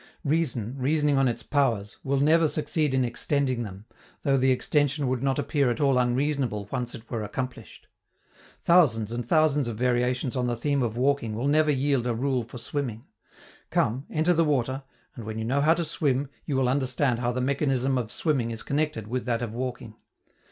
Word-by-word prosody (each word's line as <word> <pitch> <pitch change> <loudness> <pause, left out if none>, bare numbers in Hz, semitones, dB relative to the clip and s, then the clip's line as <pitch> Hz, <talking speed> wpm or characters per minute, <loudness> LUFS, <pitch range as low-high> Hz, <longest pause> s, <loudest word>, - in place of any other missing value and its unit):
Reason, 140 -7 -1
reasoning 145 +1 +2
on 135 - +3
its 115 -1 -2
powers, 115 -8 0
will 140 0 0
never 160 +3 +4
succeed 150 -1 0
in 130 -1 +2
extending 130 +1 0
them, 100 -1 -9 0.4
though 140 -2 +3
the 130 0 +3
extension 145 +2 +1
would 125 -1 -1
not 135 -1 +1
appear 145 -2 +1
at 120 - -2
all 135 -3 +3
unreasonable 125 -4 0
once 120 -1 -2
it 115 0 -12
were 115 -3 -2
accomplished. 125 +4 -6 0.8
Thousands 120 - +4
and 120 +1 -3
thousands 150 0 +2
of 115 -2 -4
variations 125 +1 0
on 125 -1 0
the 120 - 0
theme 140 +3 0
of 115 -2 -2
walking 130 -4 +1
will 120 +5 -1
never 155 +1 +3
yield 135 -3 +1
a 120 - 0
rule 130 +1 0
for 120 +2 -10
swimming: 120 -2 -4 0.6
come, 130 +6 0
enter 160 +3 +2
the 165 0 +3
water, 135 -3 0 0.3
and 120 - -8
when 110 +1 -5
you 110 - -3
know 135 +4 +1
how 160 +3 +4
to 170 - -1
swim, 145 -4 0 0.2
you 145 - -1
will 130 -1 +2
understand 130 -1 +1
how 120 0 0
the 125 - -2
mechanism 135 -1 +1
of 115 -3 -4
swimming 135 -4 0
is 115 -1 -6
connected 145 -6 -1
with 125 +3 -3
that 120 -1 -1
of 115 -2 -4
walking. 120 -2 -5
130 Hz, 195 wpm, -26 LUFS, 120-145 Hz, 0.8 s, never